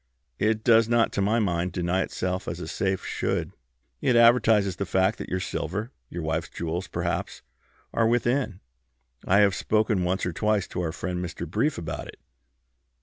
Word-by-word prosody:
It 110 0 +1
does 115 -1 +5
not, 120 -1 +3
to - - -1
my 105 +4 +2
mind, 90 -5 0
deny 90 +1 0
itself 90 0 -3
as - - -4
a - - -6
safe 95 -1 -1
should. - - -2 0.5
It 125 - +2
advertises 115 -5 +5
the 100 - -2
fact 95 +4 +1
that - - -6
your 90 - -1
silver, 105 - -3 0.2
your 85 -1 -5
wife's 80 +1 -2
jewels 85 +2 -4
perhaps, - - -3 0.5
are 115 - +3
within. 120 -3 0 0.7
I 100 +3 +5
have 100 -2 +4
spoken 105 -1 +1
once 90 +2 0
or 90 - -2
twice 105 +1 +1
to - - -3
our 85 -2 -1
friend 90 +1 -4
Mr. 85 -1 -5
Brief 145 - 0
about 85 - -5
it." - - -12
95 Hz, 175 wpm, -26 LUFS, 90-110 Hz, 0.7 s, does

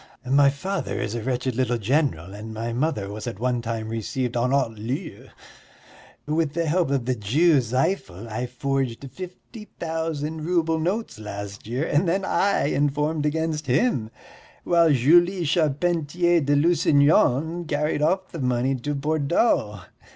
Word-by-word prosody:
My 140 +2 +5
father 190 +8 -3
is 105 - -3
a 120 - -3
wretched 125 +1 -2
little 125 -1 +1
general, 115 - 0
and 105 +2 -8
my 115 +1 -3
mother 120 -7 -1
was 105 +1 -6
at 100 - -5
one 125 0 0
time 115 -1 -4
received 115 +3 -3
en 120 +1 +1
haut 135 -3 +1
lieu. 125 - -5 1.0
With 155 -1 0
the 170 0 -1
help 165 0 +1
of 135 -4 0
the 130 - +1
Jew 140 +9 +3
Zifel 120 - -2
I 115 +3 -3
forged 135 0 -2
fifty 185 - -10
thousand 160 -1 -3
rouble 165 -1 +1
notes 185 - -2
last 100 -1 -7
year 125 +7 -1
and 160 +4 +1
then 190 +3 0
I 200 +1 +1
informed 150 +2 0
against 155 -1 -2
him, 130 - +1 0.5
while 170 -2 +4
Julie 175 +7 +4
Charpentier 170 +2 +1
de 145 0 +2
Lusignan 160 0 +3
carried 150 -1 -1
off 185 +5 +1
the 165 - -6
money 125 0 +1
to 145 +4 -3
Bordeaux. 140 - +1
145 Hz, 150 wpm, -24 LUFS, 120-165 Hz, 1.0 s, My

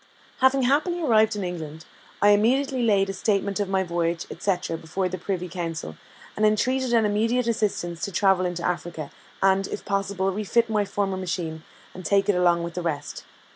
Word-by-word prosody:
Having 265 0 +4
happily 305 +7 +2
arrived 220 -5 +4
in 205 - -3
England, 160 -3 -6 0.4
I 205 - +7
immediately 255 +6 +3
laid 200 -4 +2
a - - -7
statement 200 0 0
of 200 -2 -1
my 190 0 +1
voyage, 170 -1 -1
&c., 195 -3 0 0.2
before 175 +4 -2
the 185 0 -5
Privy 180 0 -3
Council, 165 - -5 0.4
and 215 - -2
entreated 250 +4 +2
an 230 -2 +4
immediate 225 +4 +1
assistance 205 -7 -1
to 200 - -3
travel 190 -1 +3
into 175 -1 -4
Africa, 170 -4 -3 0.3
and, 195 0 +3
if - - -6
possible, 195 -1 -1
refit 220 +3 0
my 210 -1 +2
former 195 -1 -2
machine, 170 -3 -3 0.3
and 185 - -9
take 195 +3 +2
it 205 - +4
along 175 -1 +3
with 170 0 -5
the 180 - -3
rest. 150 -4 -4
195 Hz, 180 wpm, -25 LUFS, 175-215 Hz, 0.4 s, I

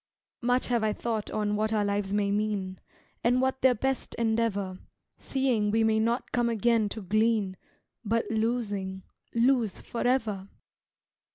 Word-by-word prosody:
Much 245 +1 +2
have 235 -2 +1
I 215 -1 +2
thought 225 -2 -3
on 210 -1 -1
what 215 +1 0
our 210 -2 +1
lives 200 -1 -1
may 200 -1 +1
mean, 205 -3 -1 0.4
And 245 +2 +3
what 265 0 0
their 255 -1 +5
best 265 +3 -2
endeavor, 220 -5 0 0.4
Seeing 250 -6 +1
we 225 +2 +2
may 220 0 +3
not 230 +3 0
come 240 -1 +1
again 230 -1 +2
to 220 0 -6
glean, 215 0 +1 0.5
But, 230 +1 0
losing, 205 -4 -1 0.3
lose 235 -3 +2
forever. 225 -6 -1
220 Hz, 145 wpm, -28 LUFS, 205-235 Hz, 0.5 s, their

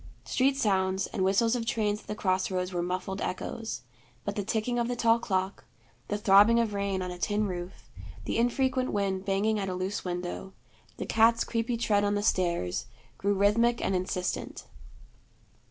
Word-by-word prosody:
Street 270 +1 +2
sounds 190 -4 +1
and 190 - -2
whistles 225 +5 +3
of 240 - -1
trains 210 -2 0
at - - -22
the 210 - -3
cross 185 -3 0
roads 185 -1 -2
were 175 - 0
muffled 185 +2 -3
echoes; 225 +4 -4 0.4
but - - -2
the 205 - -1
ticking 225 +3 -1
of 235 - 0
the 245 - -2
tall 230 -1 +3
clock, 190 -3 -2 0.4
the 205 - -1
throbbing 210 +3 +6
of 225 -3 0
rain 200 -2 -1
on 180 - -4
a 180 - -8
tin 210 +3 0
roof, 180 -1 -6 0.4
the - - -1
infrequent 255 +2 +1
wind 195 -2 -1
banging 205 +2 +1
at 195 -1 -2
a 185 - -3
loose 185 +2 -3
window, 180 +1 -4 0.4
the - - -4
cat's 230 +1 +4
creepy 235 +1 -1
tread 205 -3 +2
on 205 0 +1
the 205 - -1
stairs, 170 - 0 0.3
grew 200 +1 +1
rhythmic 230 +4 +3
and 195 - 0
insistent. 180 0 -3
205 Hz, 180 wpm, -29 LUFS, 190-230 Hz, 0.4 s, throbbing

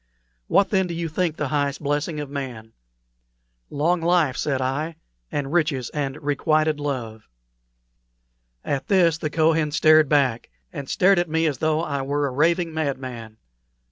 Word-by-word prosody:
What, 200 - +3
then, 190 -3 +2
do 170 - -5
you 170 0 -2
think 165 0 -1
the 150 - -2
highest 145 -2 -1
blessing 145 +2 -1
of 145 - -4
man?" 125 -6 -7 1.0
"Long 165 +4 0
life," 165 -5 +2
said 135 -2 -1
I, 140 +5 -2 0.4
"and 145 0 -3
riches 150 -8 0
and 140 -1 -3
requited 155 +1 +1
love." 120 -7 -4 1.4
At 140 +3 -2
this 175 -6 +3
the 155 - -2
Kohen 160 0 +2
started 155 0 +5
back, 135 -6 +1 0.2
and 140 -2 -6
stared 190 0 +4
at 175 -1 -1
me 160 +1 +1
as 145 -6 -1
though 155 +1 +1
I 140 -4 -2
were 145 +2 -1
a 140 - -2
raving 165 +5 +1
madman. 130 -7 -4
150 Hz, 155 wpm, -23 LUFS, 135-160 Hz, 1.4 s, started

